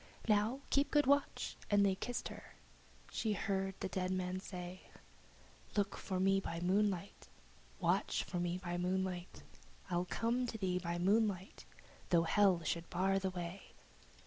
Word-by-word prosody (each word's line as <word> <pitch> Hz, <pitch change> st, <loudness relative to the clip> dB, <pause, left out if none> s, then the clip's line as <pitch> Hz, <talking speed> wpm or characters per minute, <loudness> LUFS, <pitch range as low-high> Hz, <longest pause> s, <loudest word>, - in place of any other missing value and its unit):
"Now 215 Hz, +5 st, +2 dB
keep 280 Hz, +1 st, +3 dB
good 295 Hz, -2 st, +4 dB
watch!" 280 Hz, +1 st, +1 dB
and 205 Hz, -1 st, +5 dB
they 195 Hz, -, +3 dB
kissed 245 Hz, +6 st, -3 dB
her. -, -, -11 dB, 0.6 s
She 220 Hz, -2 st, 0 dB
heard 195 Hz, -1 st, -1 dB
the -, -, 0 dB
dead 185 Hz, 0 st, -2 dB
man 185 Hz, 0 st, -1 dB
say, 180 Hz, -1 st, -8 dB, 0.9 s
"Look 200 Hz, -1 st, +1 dB
for 185 Hz, -2 st, -3 dB
me 195 Hz, +1 st, +4 dB
by 165 Hz, -3 st, -4 dB
moonlight, 195 Hz, +1 st, 0 dB, 0.5 s
Watch -, -, +1 dB
for 180 Hz, -, -3 dB
me 175 Hz, 0 st, 0 dB
by 175 Hz, -1 st, -3 dB
moonlight, 180 Hz, 0 st, -2 dB, 0.5 s
I'll 175 Hz, +1 st, +1 dB
come 240 Hz, +2 st, 0 dB
to 225 Hz, -, -4 dB
thee 185 Hz, -3 st, 0 dB
by 170 Hz, -1 st, -2 dB
moonlight, 195 Hz, +1 st, +1 dB, 0.4 s
though 170 Hz, -2 st, +5 dB
Hell 185 Hz, 0 st, +4 dB
should 170 Hz, +1 st, -2 dB
bar 190 Hz, +2 st, +2 dB
the 190 Hz, 0 st, -1 dB
way." 180 Hz, +1 st, -6 dB
190 Hz, 150 wpm, -36 LUFS, 180-205 Hz, 0.9 s, and